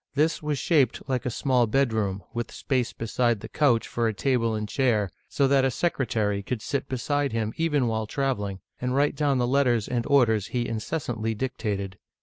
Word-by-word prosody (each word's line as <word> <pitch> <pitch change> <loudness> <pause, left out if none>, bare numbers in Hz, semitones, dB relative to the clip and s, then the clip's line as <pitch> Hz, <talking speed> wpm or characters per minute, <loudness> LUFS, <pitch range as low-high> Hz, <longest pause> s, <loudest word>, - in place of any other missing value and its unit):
This 155 +3 +2
was 150 -2 -1
shaped 135 -4 +1
like 130 -2 -1
a - - +1
small 125 -1 +2
bedroom, 110 -6 0
with 120 0 -3
space 130 -4 -1
beside 115 0 0
the - - -6
couch 125 -7 +2
for 115 -1 0
a 110 - -1
table 115 -2 +1
and 105 0 -3
chair, 110 -7 +1 0.2
so 140 - +2
that 135 0 +4
a 135 - +3
secretary 115 -9 0
could 110 +2 -4
sit 140 - -2
beside 140 +1 -1
him 110 -1 -1
even 150 -5 +1
while 110 -2 -1
traveling, 105 -8 -2 0.2
and 125 +1 -1
write 145 +1 +2
down 140 -2 +1
the 125 - +2
letters 125 -4 +2
and 120 -2 -1
orders 110 -7 +3
he 120 -1 -2
incessantly 115 -1 -2
dictated. 105 -6 -3
125 Hz, 185 wpm, -26 LUFS, 110-135 Hz, 0.2 s, that